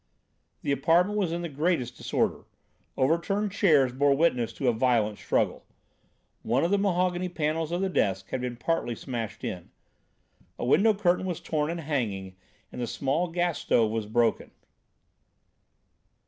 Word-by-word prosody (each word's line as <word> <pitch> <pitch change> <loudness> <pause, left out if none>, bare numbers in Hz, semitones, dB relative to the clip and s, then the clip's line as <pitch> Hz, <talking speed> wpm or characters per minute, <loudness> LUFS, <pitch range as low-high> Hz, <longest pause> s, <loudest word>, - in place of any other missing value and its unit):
The - - 0
apartment 175 +9 +2
was 185 -5 0
in 170 +1 -3
the - - -2
greatest 150 -4 -1
disorder. - - -1 0.5
Overturned 180 +9 +1
chairs 150 -10 +3
bore 140 +1 +3
witness 125 -8 +2
to 135 - -3
a 120 - +4
violent 110 -3 +1
struggle. - - 0 0.8
One 125 +6 +1
of 170 - +1
the 200 - +3
mahogany 180 -2 0
panels 160 -1 -1
of 175 +2 -1
the 195 - +1
desk 95 - 0
had 130 - -2
been 125 -1 -3
partly 120 -3 -1
smashed 115 -2 -5
in. - - -5 0.9
A - - -3
window 205 - +4
curtain 185 -2 +1
was 175 -3 -3
torn 150 -1 -1
and 170 0 -3
hanging, 105 -11 -3 0.4
and - - -6
the 120 - -2
small 140 +9 -1
gas 175 -1 -1
stove 110 -2 +2
was 110 -2 -2
broken. 115 +1 +1
150 Hz, 155 wpm, -27 LUFS, 120-175 Hz, 0.9 s, a